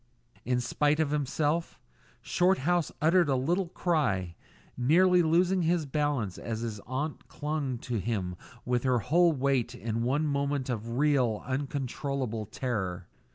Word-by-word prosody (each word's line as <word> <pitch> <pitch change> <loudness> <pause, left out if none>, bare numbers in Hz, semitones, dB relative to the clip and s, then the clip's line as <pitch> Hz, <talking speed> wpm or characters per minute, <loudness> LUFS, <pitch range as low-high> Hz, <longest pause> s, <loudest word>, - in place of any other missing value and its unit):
In 125 0 +1
spite 150 +4 +1
of 155 -3 +1
himself, 150 +3 -1 0.4
Shorthouse 175 -2 +2
uttered 170 0 +4
a 135 - +3
little 170 +9 0
cry, 140 - 0 0.4
nearly 180 +8 +4
losing 175 +3 +3
his 170 -1 +1
balance 140 - -1
as 115 -1 -4
his 110 -3 -4
aunt 140 +4 -4
clung 145 -4 -3
to 120 -3 -1
him 95 -3 -2 0.3
with 125 -1 +1
her 130 -1 +2
whole 170 - +3
weight 135 -4 0
in 115 +2 -3
one 135 +6 +1
moment 140 -2 -1
of 115 +1 -4
real, 130 -7 +2
uncontrollable 130 -3 -3
terror. 100 -7 -3
140 Hz, 135 wpm, -29 LUFS, 120-155 Hz, 0.4 s, uttered